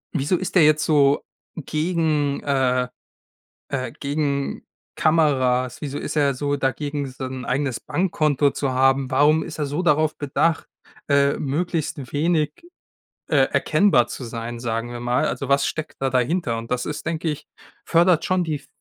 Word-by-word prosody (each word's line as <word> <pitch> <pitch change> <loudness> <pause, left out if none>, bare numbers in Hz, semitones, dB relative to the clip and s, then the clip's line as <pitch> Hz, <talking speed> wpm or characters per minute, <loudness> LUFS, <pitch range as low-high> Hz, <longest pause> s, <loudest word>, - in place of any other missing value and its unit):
wieso 155 +4 +1
ist 190 - -4
der 180 - +7
jetzt 155 0 +3
so 145 -2 +3 0.3
gegen 155 -2 0
äh, 130 -3 +1 0.9
äh, 130 -2 -2
gegen 140 -1 -2 0.3
Kameras? 130 -6 +2
Wieso 145 -1 -4
ist - - -4
er 140 -2 +3
so 145 +2 -1
dagegen, 145 +1 -2
sein 130 -1 -6
eigenes 130 0 -1
Bankkonto 155 -6 +1
zu 140 -1 -2
haben? 135 +1 +2
Warum 150 +4 +4
ist - - -7
er 150 - -1
so 145 +5 -2
darauf 155 -2 +2
bedacht, 155 +3 0 0.4
äh, 140 0 +3
möglichst 150 -2 -2
wenig, 155 0 +1 0.8
äh, - - +1 0.2
erkennbar 145 -13 +3
zu 130 - -6
sein, 115 0 -6
sagen 115 0 -3
wir 120 - -6
mal? 120 +1 +1
Also 130 +2 -4
was 140 0 +3
steckt 155 -1 -5
da 135 -1 0
dahinter?“ 130 0 0
Und 115 0 -8
das 125 0 -1
ist, 150 - -5
denke 165 0 -2
ich 150 - -6 0.4
fördert 170 -1 +3
schon 185 -1 +1
die 155 -2 -2
f 140 - -13
145 Hz, 160 wpm, -22 LUFS, 130-155 Hz, 0.9 s, der